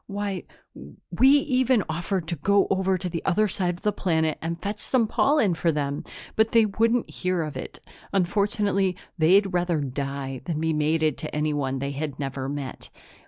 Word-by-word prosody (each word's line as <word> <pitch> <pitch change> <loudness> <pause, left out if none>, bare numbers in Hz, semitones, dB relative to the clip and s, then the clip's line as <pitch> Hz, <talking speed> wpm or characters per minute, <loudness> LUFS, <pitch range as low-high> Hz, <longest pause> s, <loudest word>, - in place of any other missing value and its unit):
"Why, 200 -2 -3 0.7
we 235 +10 +4
even 260 -5 +3
offered 175 +2 -2
to 170 - 0
go 200 +6 +3
over 190 0 +2
to 180 +1 -4
the 165 -1 -4
other 210 +3 +2
side 180 -2 -1
of 175 - -15
the 210 - +2
planet 160 -4 0
and 165 +1 -3
fetch 205 +2 -4
some 250 -4 +1
pollen 230 - +2
for 165 0 +1
them, 145 -1 -2 0.3
but 220 +1 +2
they 230 -1 +6
wouldn't 225 +3 +1
hear 180 -2 -1
of 155 -2 -6
it. - - -7 0.3
Unfortunately, 200 0 +1 0.2
they'd 190 +4 +4
rather 175 -2 +1
die 135 -1 -4
than 160 -3 -2
be 160 0 0
mated 155 +1 +1
to 155 - -5
anyone 145 -3 -1
they 140 +1 -3
had 145 0 -4
never 135 -1 -3
met." 140 -2 -6
175 Hz, 175 wpm, -25 LUFS, 150-200 Hz, 0.7 s, they